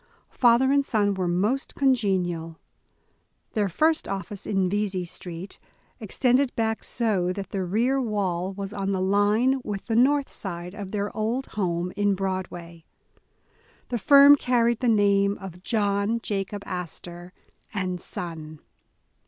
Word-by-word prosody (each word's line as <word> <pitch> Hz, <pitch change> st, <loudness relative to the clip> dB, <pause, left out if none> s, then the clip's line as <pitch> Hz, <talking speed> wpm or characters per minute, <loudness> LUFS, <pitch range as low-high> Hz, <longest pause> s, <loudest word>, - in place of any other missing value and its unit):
\/ -, -, -38 dB
Father 245 Hz, +2 st, +4 dB
and 280 Hz, 0 st, +3 dB
son 205 Hz, -6 st, +1 dB
were 185 Hz, -2 st, -2 dB
most 205 Hz, +10 st, 0 dB
congenial. 185 Hz, -11 st, 0 dB, 0.9 s
Their 205 Hz, -2 st, 0 dB
first 315 Hz, -, +1 dB
office 195 Hz, 0 st, -5 dB
in 195 Hz, -2 st, +1 dB
Vesey 195 Hz, -2 st, -1 dB
Street, 175 Hz, +2 st, -8 dB, 0.4 s
extended 250 Hz, +4 st, +1 dB
back 225 Hz, -1 st, -1 dB
so 205 Hz, -7 st, 0 dB
that 195 Hz, 0 st, -6 dB
the 195 Hz, -2 st, -2 dB
rear 235 Hz, +9 st, +1 dB
wall 190 Hz, -5 st, -1 dB
was 195 Hz, +1 st, -6 dB
on 195 Hz, -1 st, -2 dB
the 190 Hz, -, -1 dB
line 205 Hz, +7 st, +2 dB
with 200 Hz, -2 st, -5 dB
the 225 Hz, -, -1 dB
north 275 Hz, +4 st, +3 dB
side 175 Hz, -2 st, -6 dB
of 205 Hz, -2 st, -7 dB
their 205 Hz, 0 st, -3 dB
old 225 Hz, +5 st, -2 dB
Jiome 180 Hz, -3 st, -2 dB
in 205 Hz, -1 st, +1 dB
Broadway'. 180 Hz, -3 st, -5 dB, 1.1 s
The 240 Hz, -, -2 dB
firm 280 Hz, +3 st, +8 dB
carried 240 Hz, -3 st, +1 dB
the 250 Hz, -, 0 dB
name 200 Hz, -2 st, +3 dB
of 180 Hz, -2 st, -10 dB
"John 205 Hz, +1 st, 0 dB
Jacob 200 Hz, 0 st, -3 dB
Astor 175 Hz, 0 st, -7 dB, 0.4 s
and 185 Hz, -3 st, -3 dB
Son". 160 Hz, -3 st, -7 dB
200 Hz, 140 wpm, -25 LUFS, 185-230 Hz, 1.1 s, firm